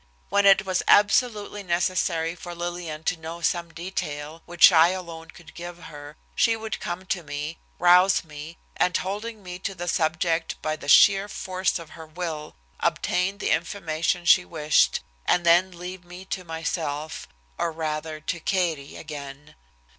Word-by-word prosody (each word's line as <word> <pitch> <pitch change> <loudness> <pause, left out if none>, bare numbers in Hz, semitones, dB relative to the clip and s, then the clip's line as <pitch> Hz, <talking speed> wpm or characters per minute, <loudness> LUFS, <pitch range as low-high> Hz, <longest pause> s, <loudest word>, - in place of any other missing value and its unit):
When 200 +1 +3
it 195 0 +6
was 185 -1 0
absolutely 205 0 +3
necessary 170 -2 0
for 175 0 -9
Lillian 170 -2 -5
to 180 - 0
know 165 +1 -7
some 170 0 -1
detail, 165 -3 -5
which 175 0 +7
I 160 +1 +7
alone 170 -3 -6
could 165 0 -15
give 175 0 -8
her, 150 -3 -11 0.2
she 230 - +3
would 220 0 -5
come 180 +2 -5
to 185 -1 -2
me, 150 +1 -6 0.2
rouse 180 +3 +5
me, 155 +1 -10 0.2
and 180 0 +2
holding 210 +3 -5
me 180 0 -7
to 195 +1 -4
the 175 0 -6
subject 165 +1 0
by 155 0 -2
the 145 -2 -8
sheer 195 +5 +7
force 185 -1 -1
of 165 -3 -11
her 160 -1 -11
will, 155 -2 -5 0.2
obtain 180 +3 0
the - - -1
information 165 -1 -1
she 180 +1 +6
wished, 150 - +2 0.3
and 175 -1 +2
then 175 +2 +5
leave 180 +1 -8
me 180 +1 -11
to 185 - -4
myself, 160 -2 -4 0.3
or 170 - 0
rather 155 -1 -4
to 170 +3 -3
Katie 165 -6 -1
again. 145 -2 -9
170 Hz, 160 wpm, -25 LUFS, 160-185 Hz, 0.3 s, which